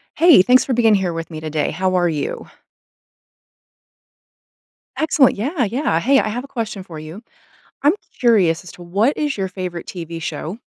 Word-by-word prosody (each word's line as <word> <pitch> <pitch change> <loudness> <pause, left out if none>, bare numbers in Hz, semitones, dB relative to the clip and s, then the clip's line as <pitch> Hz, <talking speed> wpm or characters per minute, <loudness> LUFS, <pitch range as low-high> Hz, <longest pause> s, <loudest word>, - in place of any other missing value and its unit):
Hey. 330 - +7
Thanks 250 +5 +4
for 260 - 0
being 225 -2 +4
here 190 -4 0
with 165 0 -6
me 155 -1 -7
today. 155 -1 -2
How 185 +3 -1
are 175 -1 +2
you? 150 -3 -4 2.5
Excellent. 305 -4 +3
Yeah, 260 - -1
yeah. 225 - 0
Hey. 270 +8 +3
I 215 - +1
have 245 +4 -4
a - - -11
question 220 -6 -5
for 170 -4 -10
you. 155 +7 -9 0.6
I'm 295 +3 +5 0.3
curious 195 -10 +3
as 180 - -11
to 175 - -13
what 200 +10 +1
is 295 -4 -1
your 190 -1 -2
favorite 180 -2 -6
TV 165 -2 -7
show? 160 +6 -5
190 Hz, 175 wpm, -19 LUFS, 170-250 Hz, 2.5 s, Hey